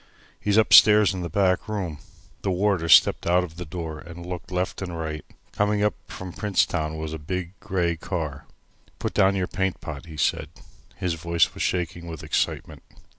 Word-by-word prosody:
"He's 105 0 +1
upstairs 105 -2 +7
in 95 - -4
the 85 - -4
back 95 +3 +1
room." 90 -8 -3 0.4
The - - -2
warder 95 -3 +1
stepped 80 - +6
out 90 +1 +4
of 85 -2 -8
the 90 - -5
door 80 -1 -6
and 85 +1 -10
looked 90 +1 -7
left 90 +1 -2
and 90 -3 -5
right. 80 -2 -4 0.3
Coming 105 0 +1
up 105 - +2
from 95 -2 -8
Princetown 80 -6 0
was 80 0 -5
a 80 - -5
big, 90 +3 -4
grey 85 -3 -1
car. 75 -5 -4 0.5
"Put - - -3
down 95 +1 +4
your 95 -2 0
paint 95 0 -2
pot," 80 0 -8
he 80 -2 -10
said. 75 - 0 0.5
His 90 -2 -2
voice 85 0 +1
was - - -7
shaking 85 -1 -2
with 80 -3 -7
excitement. - - -2
90 Hz, 180 wpm, -25 LUFS, 80-95 Hz, 0.5 s, upstairs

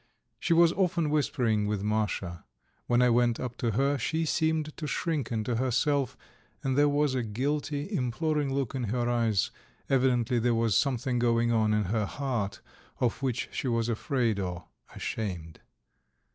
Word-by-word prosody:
She - - -2
was 170 0 +6
often 170 -5 +1
whispering 120 -8 +1
with 105 -1 -1
Masha. 105 -5 -1 0.4
When 120 +1 +4
I 125 - +4
went 120 -1 +2
up 125 -1 -4
to 115 -3 -1
her 140 +4 +1
she 160 +8 0
seemed 160 -1 0
to 155 - -4
shrink 150 -5 -2
into 115 +1 -1
herself, 130 +2 +1 0.5
and 130 -1 0
there 145 +1 +4
was 145 -1 +2
a 130 - 0
guilty, 145 - -2
imploring 145 +2 0
look 135 -2 -1
in 130 -3 -2
her 120 +3 -1
eyes; 115 -4 +1 0.4
evidently 125 -2 +2
there 120 0 +2
was 115 -3 +2
something 125 -1 +1
going 120 0 +2
on 110 -2 +2
in 105 0 +2
her 105 +2 -1
heart 120 -7 -3 0.4
of 125 +1 0
which 130 -3 -1
she - - -3
was 115 -1 0
afraid 115 -2 0
or 90 -2 -4 0.3
ashamed. 85 -7 -4
120 Hz, 160 wpm, -29 LUFS, 110-140 Hz, 0.5 s, was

